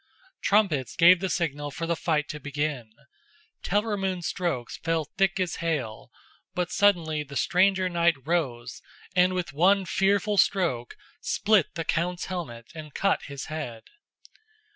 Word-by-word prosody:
Trumpets 190 - +2
gave 175 +1 +7
the 190 +1 -2
signal 145 -5 -2
for 165 +4 -5
the 170 0 0
fight 155 -3 0
to 150 - -5
begin. 145 -5 -3 0.7
Telramund's 195 -3 -1
strokes 170 -10 -2
fell 165 -1 -1
thick 195 +4 0
as 180 -3 -1
hail, 150 -10 -3 0.5
but 180 -1 -1
suddenly 170 -7 +2
the 145 -1 -9
stranger 190 +3 +3
knight 170 -2 +2
rose 125 -8 -2 0.3
and 180 0 +4
with 180 -5 -3
one 190 +6 +4
fearful 200 +3 +1
stroke 145 - +1 0.2
split 200 -8 +2
the 165 -1 -3
count's 175 +3 -1
helmet 120 -11 -6
and 155 -3 -10
cut 195 0 +1
his 140 -2 -6
head. 145 -8 -6
170 Hz, 140 wpm, -26 LUFS, 145-185 Hz, 0.7 s, gave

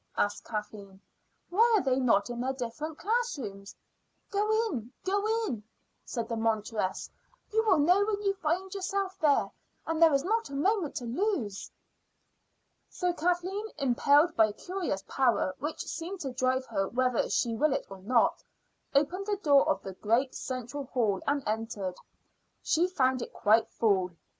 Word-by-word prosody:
asked 205 0 0
Kathleen. 210 -3 -6 0.5
"Why 455 +5 +5
are 390 - 0
they 260 -1 +2
not 245 -3 +2
in 240 0 -4
their 260 +1 -1
different 270 +5 -5
classrooms?" 280 - -2 0.6
"Go 415 +1 0 0.2
in 250 - -4
go 400 +2 +1 0.2
in," 230 - -3 0.4
said 235 -3 -4
the 230 - -2
monitress. 220 -3 -1 0.5
"You 445 0 +3
will - - +5
know 355 +7 +4
when 410 -1 -1
you 395 -1 +2
find 370 +1 -2
yourself 390 0 -2
there; 295 -3 +3 0.3
and 325 0 -2
there 330 -1 +8
is 275 -1 +2
not 450 +5 0
a 275 - -6
moment 370 +1 +1
to 245 - -4
lose." 245 - -2 1.2
So 360 -1 -1
Kathleen, 360 +5 -1
impelled 285 +4 +3
by 220 -1 +5
a 210 - -6
curious 350 - -3
power 240 -8 +1
which 300 +3 -4
seemed 350 +4 -5
to 270 -3 -4
drive 260 0 0
her 195 -5 -1
whether 250 +1 +1
she 235 - +1
will 300 +5 +2
it - - -1
or 195 - -10
not, 230 +5 +2 0.5
opened 355 +8 +1
the 410 -1 0
door 285 -7 +4
of 195 - 0
the 190 - -6
great 230 +7 +1
central 255 +2 -5
hall 220 -7 0
and 285 -1 +1
entered. 215 -3 -2 0.7
She 340 +3 +2
found 260 -8 +1
it - - -6
quite 220 +2 +3
full. 195 -5 +1
270 Hz, 160 wpm, -29 LUFS, 225-360 Hz, 1.2 s, there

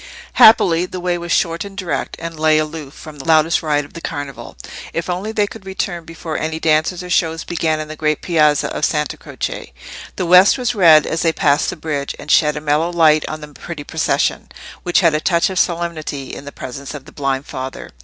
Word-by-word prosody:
Happily 180 -5 +6
the 185 - -6
way 175 0 -1
was 170 0 -6
short 170 +2 +1
and 200 -1 -10
direct, 185 -3 -3
and 165 -1 -7
lay 155 0 +4
aloof 155 -2 -4
from 155 -2 -11
the - - -8
loudest 160 0 +4
riot 150 -2 0
of - - -18
the 170 - -8
Carnival, 145 -4 -6 0.4
if 170 +2 -2
only 190 +5 -3
they 210 -2 +1
could 205 0 -10
return 190 -3 -4
before 165 -1 -5
any 160 0 -3
dances 160 +3 +1
or 180 - -8
shows 165 -2 +1
began 160 -2 -1
in 155 - -5
the 155 - -7
great 155 -1 -1
piazza 150 -4 +2
of - - -4
Santa 150 -3 0
Croce. - - -6 0.4
The 185 - -2
west 180 +7 +6
was 250 -1 -1
red 165 -7 +6
as 165 - -2
they 165 - +3
passed 145 -2 +2
the - - -4
bridge, 145 -3 -4
and 150 - -5
shed 150 -1 +4
a - - -4
mellow 150 +3 +1
light 155 -3 +4
on 155 0 -6
the 150 - -9
pretty 150 +1 -8
procession, - - -1 0.3
which 175 +1 +2
had 165 -3 +4
a 155 - +1
touch 170 +3 +2
of 185 - -1
solemnity 165 -5 -2
in 140 - -8
the 145 - -7
presence 135 +2 -8
of 140 -2 -9
the - - -13
blind 135 -1 -2
father. 130 0 -7
160 Hz, 220 wpm, -18 LUFS, 150-175 Hz, 0.4 s, Happily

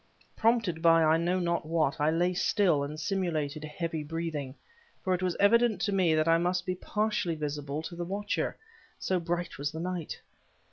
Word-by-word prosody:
Prompted 225 -8 +1
by 165 -1 +5
I 160 +1 +4
know 175 +2 +1
not 170 -1 0
what, 160 -1 0
I 150 - +4
lay 175 +3 +1
still 180 -4 +2
and 150 +2 -5
simulated 155 -4 -2
heavy 160 +1 -4
breathing; 150 -4 -4 0.5
for 185 - +1
it 180 - -1
was 180 -2 0
evident 220 0 +4
to 205 - 0
me 180 -5 +3
that 155 +1 +2
I 165 0 +5
must 180 +1 0
be 185 - -1
partly 210 -2 -1
visible 145 0 -4
to 170 - -7
the 175 - -4
watcher, 200 +4 -2 0.4
so 185 -1 0
bright 175 -1 -3
was 145 +1 -2
the 160 - -6
night. 175 -2 -4
170 Hz, 185 wpm, -29 LUFS, 155-185 Hz, 0.5 s, by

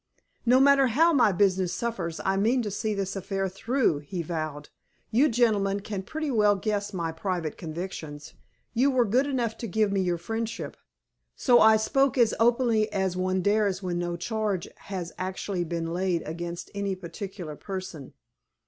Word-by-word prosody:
"No 250 +2 +6
matter 275 0 +6
how 325 +8 +4
my 240 -7 +5
business 185 -1 +2
suffers, 190 -9 -3
I 190 - +2
mean 230 +6 +2
to 210 - -3
see 210 +1 -2
this 195 -1 -3
affair 195 0 -2
through," 195 - 0
he 170 +4 -5
vowed. 155 -3 -4 0.4
"You 265 +7 +4
gentlemen 205 -4 +2
can 205 -2 -4
pretty 310 +8 -4
well 210 -3 +4
guess 205 +1 -2
my 170 -4 -2
private 165 -1 -3
convictions. 160 -3 -7 0.4
You 255 +4 +3
were 255 -3 +3
good 250 +7 +2
enough 240 -5 -1
to 230 - -4
give 215 +1 +1
me 195 -1 +1
your 175 -2 0
friendship, 225 +6 -4 0.6
so 245 -3 +5
I 220 0 +7
spoke 270 +5 +1
as 235 -3 +4
openly 230 -2 +3
as 190 -3 0
one 185 0 0
dares 205 -2 +1
when 175 -1 -2
no 175 0 -2
charge 205 -1 -2
has 185 -4 -6
actually 185 -1 -3
been 165 0 -3
laid 180 -1 0
against 170 +2 -6
any 200 -1 -2
particular 180 -2 -7
person." 185 -6 -7
195 Hz, 165 wpm, -27 LUFS, 175-225 Hz, 0.6 s, I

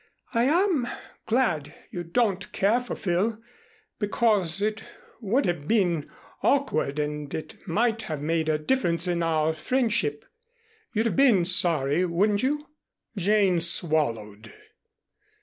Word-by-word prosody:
I 235 +1 +2
am 325 -3 +2 0.4
glad 220 - 0 0.2
you 175 - -5
don't 195 +2 -1
care 210 +5 +2
for 245 - -6
Phil, 200 +5 -1 0.6
because 205 -5 +1
it 215 +1 -1 0.4
would 240 +5 0
have 165 -4 -2
been 175 -8 +1 0.3
awkward 155 - +1
and 150 -1 -3
it 160 - -9
might 225 +5 +1
have 155 -2 -3
made 160 +1 -1
a 155 - +2
difference 170 -1 0
in 175 -1 0
our 160 -1 +1
friendship. 210 - -1 0.7
You'd 220 0 0
have 230 - 0
been 240 -10 +4
sorry, 170 -3 +2
wouldn't 200 +4 +1
you?" 295 +3 -1 0.5
Jane 195 -2 +2
swallowed. 115 - +1
180 Hz, 125 wpm, -26 LUFS, 160-225 Hz, 0.7 s, been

